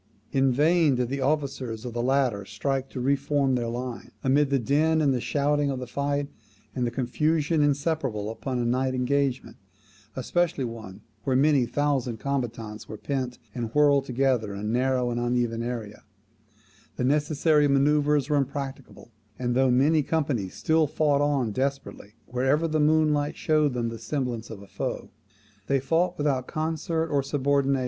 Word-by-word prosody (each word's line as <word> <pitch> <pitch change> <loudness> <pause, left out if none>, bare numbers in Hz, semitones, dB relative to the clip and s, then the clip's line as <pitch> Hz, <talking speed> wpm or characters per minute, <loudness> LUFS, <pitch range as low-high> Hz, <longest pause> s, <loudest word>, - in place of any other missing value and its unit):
In 135 -1 +3
vain 155 +2 +3
did 125 -1 -1
the 140 +1 -3
officers 130 -5 -2
of 120 - -5
the 120 - -2
latter 125 -5 +1
strive 135 +6 -3
to - - -6
re 135 +3 +2
form 140 -1 0
their 120 -2 0
line. 120 +1 -5
Amid 140 +2 +3
the 140 - +2
din 150 +6 +2
and 145 -3 +3
the 125 - -1
shouting 145 +1 +1
of 135 - -2
the 125 - -5
fight, 140 +3 -2 0.5
and 125 -2 0
the - - 0
confusion 150 +6 0
inseparable 140 -7 0
upon 125 +3 -4
a 120 - 0
night 130 +2 0
engagement, 135 +1 -1 0.6
especially 165 +3 0
one 110 -4 -7 0.2
where 130 - 0
many 140 -2 +3
thousand 135 -5 0
combatants 115 -5 -4
were 110 - -6
pent 130 0 -3 0.2
and 115 -3 -4
whirled 145 -2 +4
together 125 -5 0
in - - -6
a - - -6
narrow 125 +2 +1
and 120 - -2
uneven 120 -1 0
area, 115 -3 -5 0.9
the - - -2
necessary 150 +2 +3
manoeuvres 145 +1 +3
were 150 -1 +2
impracticable; 135 -3 -5 0.3
and 120 -1 -1
though 130 +1 +3
many 145 +5 +4
companies 135 - -1
still 160 -1 +2
fought 145 -1 +1
on 140 -6 +1
desperately, 135 -4 -4
wherever 135 +6 +1
the 155 -1 0
moonlight 150 -1 +2
showed 150 -4 +2
them 120 -1 -1
the 115 -1 -7
semblance 120 -1 -3
of 100 -3 -9
a - - -14
foe, - - -5 0.6
[THUC. 140 +6 +1 1.5
vii. 135 - +2
135 Hz, 155 wpm, -26 LUFS, 120-145 Hz, 1.5 s, whirled